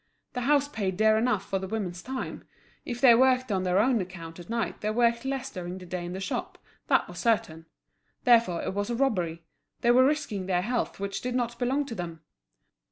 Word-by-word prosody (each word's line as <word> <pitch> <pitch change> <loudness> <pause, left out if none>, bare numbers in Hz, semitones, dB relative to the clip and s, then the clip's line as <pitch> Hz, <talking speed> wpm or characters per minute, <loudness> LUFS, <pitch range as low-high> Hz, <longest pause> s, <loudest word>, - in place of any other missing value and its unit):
The 250 - -2
house 285 +2 +3
paid 195 -9 -3
dear 220 +1 +5
enough 220 -3 +1
for 195 - -1
the 190 - -5
women's 185 -4 -3
time; 260 0 -5 0.4
if 240 -1 -4
they 245 -2 +8
worked 255 0 +3
on 190 -2 +1
their 185 0 +1
own 235 +1 +3
account 175 -2 -8
at 175 - -11
night 230 -1 -2
they 210 - -1
worked 235 +2 +2
less 270 0 -3
during 180 -2 -6
the 185 - -10
day 180 0 -4
in 175 +1 -5
the 190 - -4
shop, 190 - -4 0.3
that - - +3
was - - -9
certain; 165 -9 0 0.6
therefore 230 -9 +4
it - - -2
was 205 +2 -2
a 240 - -1
robbery, 180 -11 0 0.4
they 240 - +4
were 255 +2 +6
risking 260 -10 0
their 180 -1 +1
health 240 0 -2
which 200 0 -3
did 250 0 -3
not 240 -1 -1
belong 265 +4 +1
to 250 - -6
them. 170 -5 -6
220 Hz, 215 wpm, -28 LUFS, 185-250 Hz, 0.6 s, they